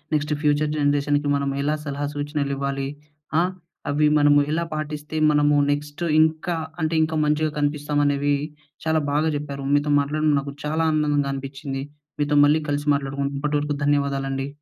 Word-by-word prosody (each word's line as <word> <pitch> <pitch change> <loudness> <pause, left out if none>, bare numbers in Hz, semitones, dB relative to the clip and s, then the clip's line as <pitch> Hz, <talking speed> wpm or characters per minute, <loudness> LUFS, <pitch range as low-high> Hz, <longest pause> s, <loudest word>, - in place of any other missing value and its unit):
Next 150 0 0
future 150 0 +2
జనరేషన్‍కి 145 0 +1
మనము 140 -1 -1
ఎలా 150 +2 +1
సలహా 145 0 -3
సూచనలివ్వాలి. 140 -2 -2 0.5
ఆహ్, 180 +2 +1 0.4
అవి 150 +1 +3
మనము 145 0 +5
ఎలా 165 +2 0
పాటిస్తే 150 0 -5 0.2
మనము 145 0 +3 0.2
నెక్స్ట్ 145 +3 -3 0.2
ఇంకా 160 +2 +1 0.3
అంటే 160 +1 0
ఇంకా 160 0 -2
మంచిగా 150 +1 +1
కనిపిస్తాం 145 0 0
అనేవి 145 0 +2 0.5
చాలా 160 0 +2
బాగా 150 +2 +1
చెప్పారు. 140 -2 -6
మీతో 145 +1 +2
మాట్లాడడం 150 +2 +1
నాకు 140 0 -6
చాలా 155 +2 0
ఆనందంగా 145 -2 +1
అనిపిచ్చింది. 135 0 -5 0.4
మీతో 145 0 +1
మళ్ళీ 155 +2 +3
కలిసి 145 +1 -2
మాట్లాడుకు 140 0 -3
అప్పటివరకు 145 0 -1
ధన్యవాదాలండి. 135 -1 0
145 Hz, 145 wpm, -23 LUFS, 140-150 Hz, 0.5 s, మనము